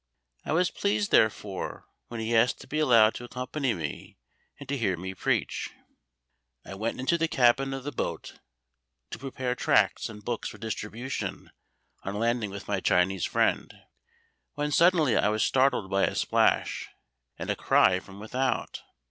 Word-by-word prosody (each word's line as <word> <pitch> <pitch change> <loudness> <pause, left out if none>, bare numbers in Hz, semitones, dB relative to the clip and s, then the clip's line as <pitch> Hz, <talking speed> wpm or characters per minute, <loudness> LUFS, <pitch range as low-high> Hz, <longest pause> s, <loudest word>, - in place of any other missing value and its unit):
I - - -4
was 180 +2 +2
pleased, 205 0 -1
therefore, 105 -3 +1 0.2
when 120 - -6
he 110 +1 -1
asked 115 +2 +3
to - - -12
be 155 - -2
allowed 115 -7 +5
to - - -8
accompany 125 +1 -2
me, 80 -5 -6 0.4
and - - -10
to 140 - -1
hear 100 -8 0
me 95 +2 -5
preach. 95 - -1 1.0
I - - -8
went 110 +5 -3
into 170 +7 +1
the 165 - +2
cabin 135 -1 +3
of 135 -1 -5
the 145 - -4
boat 85 - -5 0.7
to - - -6
prepare 130 -1 -3
tracts 125 - +2
and 105 -2 -11
books 120 -2 -3
for - - -11
distribution 110 +4 -5 0.5
on 100 - -5
landing 115 0 0
with 100 0 -8
my 100 -2 0
Chinese 90 +1 +2
friend, - - +1 0.8
when 150 0 -2
suddenly 165 -5 +4
I 100 - +3
was 110 0 +1
startled 130 -7 +2
by 100 0 +3
a - - -3
splash - - +1 0.5
and - - -3
a - - -1
cry 95 0 +3
from 95 +1 -13
without. 125 +5 -2
115 Hz, 165 wpm, -27 LUFS, 100-135 Hz, 1.0 s, allowed